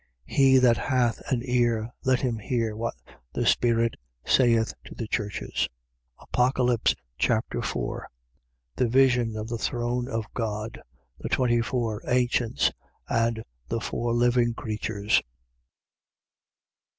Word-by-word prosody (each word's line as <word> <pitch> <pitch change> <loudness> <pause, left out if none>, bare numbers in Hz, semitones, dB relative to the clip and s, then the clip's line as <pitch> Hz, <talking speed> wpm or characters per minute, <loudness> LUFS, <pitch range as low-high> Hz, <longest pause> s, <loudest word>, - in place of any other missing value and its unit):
3:22. - - -9
He 135 -1 +6
that 125 -3 +5
hath 120 +1 +1
an 120 -2 +1
ear, 120 -2 +1
let 130 -1 +2
him 120 -4 -1
hear 110 +1 -1
what 115 +2 -3 0.4
the - - -1
Spirit 115 -1 +3 0.3
saith 115 -3 +3
to - - -10
the 115 - -4
churches. 105 -2 -2 0.5
Apocalypse 125 -2 +2 0.2
Chapter - - +1
4 - - -3 0.7
The 125 - +2
vision 125 -2 +3
of 110 +1 -4
the 115 -1 -4
throne 120 +1 -1
of 115 -4 -2
God, 110 -1 -3 0.4
the - - -5
twenty 120 -2 +2
four 115 -2 -2
ancients 125 -2 +2 0.4
and 115 -1 0 0.2
the 115 - -1
four 120 +1 -2
living 120 -1 +3
creatures. 105 -2 0
120 Hz, 125 wpm, -26 LUFS, 115-125 Hz, 0.7 s, He